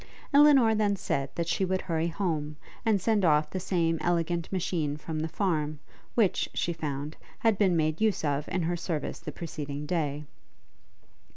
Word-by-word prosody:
Elinor 280 -6 +7
then 210 -2 +2
said 140 -7 -2
that 170 -1 -1
she 175 +3 0
would 185 0 0
hurry 165 -2 -1
home, 160 -4 -2 0.3
and 220 -3 +3
send 210 +1 +1
off 150 -2 +3
the 185 - -2
same 170 -3 0
elegant 170 0 0
machine 165 -6 -1
from 155 +1 -5
the 160 - -1
farm, 155 -4 -1 0.4
which, 215 -6 +2
she 170 - 0
found, 150 -1 -4 0.2
had 225 -2 +3
been 190 -4 +3
made 155 +2 0
use 215 -7 +2
of 145 0 -1
in 180 -1 -1
her 175 +2 0
service 165 -3 -3
the - - -6
preceding 145 -3 -5
day. 150 -3 -1
170 Hz, 170 wpm, -28 LUFS, 150-190 Hz, 0.4 s, Elinor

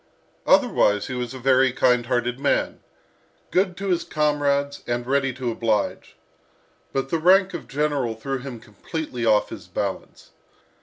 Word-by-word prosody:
Otherwise 105 0 +3
he 130 - -5
was 125 -1 -3
a - - -6
very 130 0 +3
kind 125 -1 +2
hearted 125 0 -1
man, 140 - 0 0.7
good 185 -1 +1
to 195 0 -3
his 175 -2 +1
comrades, 145 -2 0
and 120 0 -2
ready 135 +1 +1
to 125 -1 -3
oblige. 110 -2 -1 0.8
But 135 0 -2
the 165 - 0
rank 190 +3 +4
of 170 - -6
general 140 -5 -1
threw 135 +4 -4
him 125 -2 -8
completely 120 - -5
off 105 -1 +3
his - - -9
balance. - - -5
135 Hz, 150 wpm, -23 LUFS, 120-150 Hz, 0.8 s, rank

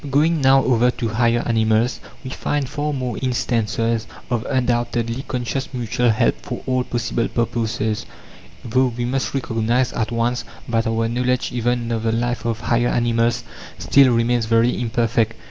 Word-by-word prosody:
Going 155 +3 +2
now 135 0 +5
over 125 -1 +3
to 120 -2 -2
higher 120 +1 +2
animals, 110 +1 +1 0.2
we 130 - -6
find 145 0 -2
far 150 +2 -2
more 130 -3 -3
instances 115 -3 0 0.2
of 120 -2 0
undoubtedly 120 -1 0
conscious 125 +2 -3
mutual 120 0 0
help 110 - +1
for - - -6
all 130 -1 +1
possible 120 -1 -1
purposes, 110 -2 -1 0.6
though 130 +3 +2
we 120 - -1
must 135 +2 -2
recognize 120 0 0
at 115 0 -2
once 120 +1 0 0.3
that 115 0 +1
our 115 0 0
knowledge 125 +2 0
even 120 0 -1
of 115 -1 -1
the 115 0 0
life 120 +1 -1
of 115 -1 -2
higher 120 0 +1
animals 120 0 +1 0.3
still 135 -2 +5
remains 115 -1 +1
very 115 +2 +2
imperfect. 115 -1 0
120 Hz, 155 wpm, -21 LUFS, 115-125 Hz, 0.6 s, now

